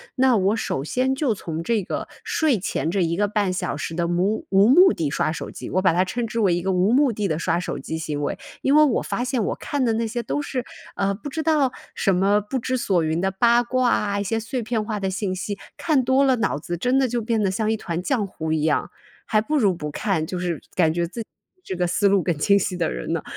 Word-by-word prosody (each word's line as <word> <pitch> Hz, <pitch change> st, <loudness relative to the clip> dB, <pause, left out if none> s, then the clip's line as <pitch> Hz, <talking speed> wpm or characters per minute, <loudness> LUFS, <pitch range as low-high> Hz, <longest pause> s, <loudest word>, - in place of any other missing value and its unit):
那 260 Hz, -3 st, +4 dB
我 195 Hz, +3 st, +2 dB
首 135 Hz, -10 st, -2 dB
先 260 Hz, -, 0 dB
就 265 Hz, -5 st, +1 dB
从 165 Hz, -4 st, -5 dB
这 225 Hz, -1 st, 0 dB
个 -, -, -4 dB, 0.2 s
睡 290 Hz, -, +1 dB
前 165 Hz, -3 st, -2 dB
这 195 Hz, -, 0 dB
1 170 Hz, -1 st, +1 dB
个 205 Hz, +1 st, +2 dB
半 205 Hz, -2 st, 0 dB
小 180 Hz, -5 st, -2 dB
时 160 Hz, +2 st, -4 dB
的 170 Hz, -1 st, 0 dB
无 185 Hz, +5 st, 0 dB
无 195 Hz, +1 st, +5 dB
目 360 Hz, +8 st, +7 dB
的 155 Hz, -4 st, -1 dB
刷 155 Hz, -, 0 dB
手 165 Hz, -, -5 dB
机， -, -, -8 dB
我 185 Hz, -, +1 dB
把 185 Hz, -2 st, +4 dB
它 180 Hz, +3 st, +2 dB
称 235 Hz, +4 st, -3 dB
之 230 Hz, +1 st, -3 dB
为 190 Hz, -5 st, +3 dB
一 175 Hz, -, 0 dB
个 190 Hz, +1 st, 0 dB
无 185 Hz, +4 st, +2 dB
目 275 Hz, -2 st, +4 dB
的 205 Hz, -2 st, -2 dB
地 155 Hz, -, -1 dB
刷 170 Hz, 0 st, 0 dB
手 180 Hz, -, -4 dB
机 160 Hz, -, -5 dB
行 150 Hz, -2 st, -3 dB
为。 145 Hz, -, -2 dB, 0.2 s
因 275 Hz, +2 st, +3 dB
为 305 Hz, -, +7 dB
我 275 Hz, -6 st, +2 dB
发 245 Hz, -, -2 dB
现 250 Hz, -3 st, -1 dB
我 -, -, -1 dB
看 285 Hz, -2 st, -2 dB
的 230 Hz, -2 st, +2 dB
那 230 Hz, +1 st, 0 dB
些 240 Hz, +2 st, -3 dB
都 290 Hz, -, -2 dB
是， 260 Hz, -3 st, -3 dB, 0.3 s
呃， 195 Hz, 0 st, 0 dB
不 290 Hz, +8 st, -7 dB
知 315 Hz, +3 st, -3 dB
道 295 Hz, -5 st, +2 dB, 0.2 s
什 195 Hz, -3 st, +2 dB
么 200 Hz, +3 st, +3 dB
不 255 Hz, +6 st, -3 dB
知 255 Hz, +2 st, -1 dB
所 185 Hz, -8 st, +1 dB
云 160 Hz, +1 st, 0 dB
的 190 Hz, +2 st, 0 dB
八 235 Hz, +5 st, +3 dB
卦 255 Hz, 0 st, +1 dB
啊， 200 Hz, -1 st, 0 dB
一 200 Hz, -, -1 dB
些 225 Hz, +3 st, -1 dB
碎 245 Hz, +3 st, -3 dB
片 220 Hz, -1 st, -1 dB
化 210 Hz, -1 st, -3 dB
的 195 Hz, -1 st, -1 dB
信 190 Hz, 0 st, -2 dB
息， 200 Hz, +2 st, -4 dB, 0.2 s
看 295 Hz, -6 st, +2 dB
多 260 Hz, +2 st, +3 dB
了， 265 Hz, -2 st, +4 dB
脑 220 Hz, -9 st, 0 dB
子 175 Hz, +3 st, -4 dB
真 250 Hz, +8 st, +1 dB
的 265 Hz, -, +3 dB
就 240 Hz, 0 st, -2 dB
变 225 Hz, 0 st, 0 dB
得 200 Hz, -, +2 dB
像 215 Hz, +3 st, 0 dB
一 220 Hz, -, 0 dB
团 170 Hz, -4 st, -4 dB
浆 220 Hz, +1 st, 0 dB
糊 160 Hz, -4 st, -5 dB
一 155 Hz, -1 st, +1 dB
样， 155 Hz, -2 st, 0 dB, 0.3 s
还 215 Hz, -, +2 dB
不 300 Hz, +8 st, -1 dB
如 205 Hz, -8 st, +3 dB
不 150 Hz, -3 st, -5 dB
看 165 Hz, 0 st, -1 dB
就 180 Hz, -, -5 dB
是 175 Hz, -3 st, -2 dB
感 160 Hz, -3 st, +3 dB
觉 170 Hz, 0 st, -1 dB
自 230 Hz, +7 st, -6 dB
己 220 Hz, -, -9 dB, 0.4 s
这 185 Hz, -, -5 dB
个 180 Hz, 0 st, 0 dB
思 200 Hz, +4 st, +2 dB
路 200 Hz, -1 st, +3 dB
更 175 Hz, -4 st, 0 dB
清 200 Hz, +7 st, +4 dB
晰 185 Hz, -1 st, -2 dB
的 170 Hz, -2 st, 0 dB
人 -, -, -4 dB
呢。 165 Hz, -, -1 dB
205 Hz, 290 characters per minute, -23 LUFS, 175-240 Hz, 0.4 s, 目